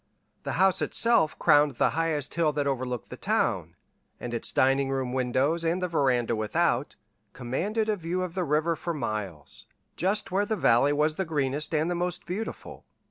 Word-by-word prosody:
The - - -2
house 190 +1 +3
itself 230 -10 +2
crowned 145 -3 +4
the - - +2
highest 155 -3 -1
hill 165 -2 +2
that 145 -1 -1
overlooked 130 -4 -3
the - - -7
town, - - -1 0.4
and 120 -1 -6
its 115 - -4
dining 135 +1 +2
room 130 -2 -2
windows 130 +6 0
and 165 +2 0
the 180 - -1
veranda 125 -8 +1
without, 125 +5 0 0.4
commanded 190 - -2
a 215 - +1
view 180 +1 -2
of 180 -2 -5
the 185 0 -1
river 155 +2 +1
for 170 +1 -4
miles, 90 - -5 0.3
just 195 +3 0
where 200 +2 +1
the 220 - 0
valley 130 - +3
was 150 +1 +1
the 190 - 0
greenest 150 0 -1
and 155 +2 +1
the 175 - 0
most 175 0 -2
beautiful. 200 +6 -6
150 Hz, 180 wpm, -27 LUFS, 130-175 Hz, 0.4 s, crowned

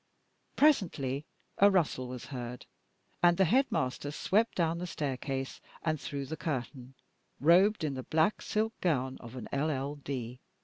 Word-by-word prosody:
Presently 155 - +2 0.3
a 200 - +8
rustle 160 -9 +1
was 125 -1 -7
heard, 125 -1 -6 0.6
and 175 -1 +5
the 190 - +5
headmaster 160 - +1
swept 205 +9 +1
down 170 -1 +1
the 180 - -4
staircase 135 -3 -3 0.2
and 155 -3 0
through 140 +1 -4
the 160 - -5
curtain, 135 -4 -4 0.4
robed 180 +6 +5
in 150 -3 0
the 130 - -4
black 160 +9 +1
silk 220 +1 0
gown 130 -7 0
of 120 +1 -10
an 125 - -6
LL.D. 140 -4 -2
145 Hz, 140 wpm, -31 LUFS, 130-175 Hz, 0.6 s, a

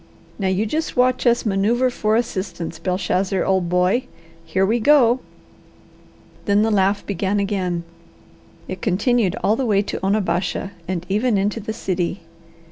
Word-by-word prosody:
Now 195 - 0
you 190 +3 +1
just 310 +7 -3
watch 255 0 +2
us 240 0 +3
manoeuvre 225 +5 +2
for 215 -2 0
assistance, 185 -7 -3
Belshazzar, 185 +1 0
old 190 -3 +1
boy! 180 +7 +2 0.4
Here 185 +4 +1
we 225 +4 +1
go!" 250 -1 +5 1.3
Then 205 +1 +3
the 225 - +1
laugh 200 0 +2
began 200 +1 -1
again. 185 -4 -1 0.8
It - - -6
continued 215 -1 +1
all 210 - +3
the 260 +1 -1
way 200 -2 +3
to 195 - -5
Onabasha 195 -1 0 0.2
and 180 -1 -3
even 215 +3 +1
into 205 +3 0
the 220 +1 -5
city. 185 -3 -2
200 Hz, 145 wpm, -21 LUFS, 185-225 Hz, 1.3 s, go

